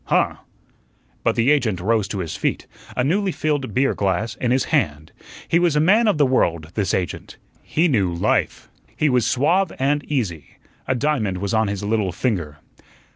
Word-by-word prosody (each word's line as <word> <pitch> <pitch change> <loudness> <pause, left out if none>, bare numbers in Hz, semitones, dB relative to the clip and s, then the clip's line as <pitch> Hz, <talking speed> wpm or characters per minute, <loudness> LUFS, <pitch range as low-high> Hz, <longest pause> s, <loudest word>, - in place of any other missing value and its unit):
Huh!" - - +1 0.9
But - - +1
the 120 +5 +3
agent 115 - +1
rose 105 +2 +1
to 100 -1 -4
his 85 - -5
feet, - - -2 0.3
a 125 - +2
newly 190 +7 +1
filled 145 -6 -2
beer 135 +1 +2
glass 100 +3 -1
in 125 - -1
his 130 +1 +2
hand. 80 - 0 0.4
He 170 - +3
was 175 -4 +2
a - - +3
man 210 +9 +4
of 205 - +2
the 145 - +4
world, 85 - 0
this 100 -3 0
agent. 90 -2 -4 0.2
He 165 +3 +1
knew 100 - +1
life. 85 - -1 0.3
He 150 - +2
was 125 -3 +2
suave 165 +8 +2
and 145 +2 +1
easy. 90 - -3 0.3
A 130 - +1
diamond 120 -8 0
was 100 +2 -3
on 110 -1 +2
his 100 0 -4
little 105 -2 0
finger. 85 - -2
120 Hz, 180 wpm, -21 LUFS, 95-145 Hz, 0.9 s, man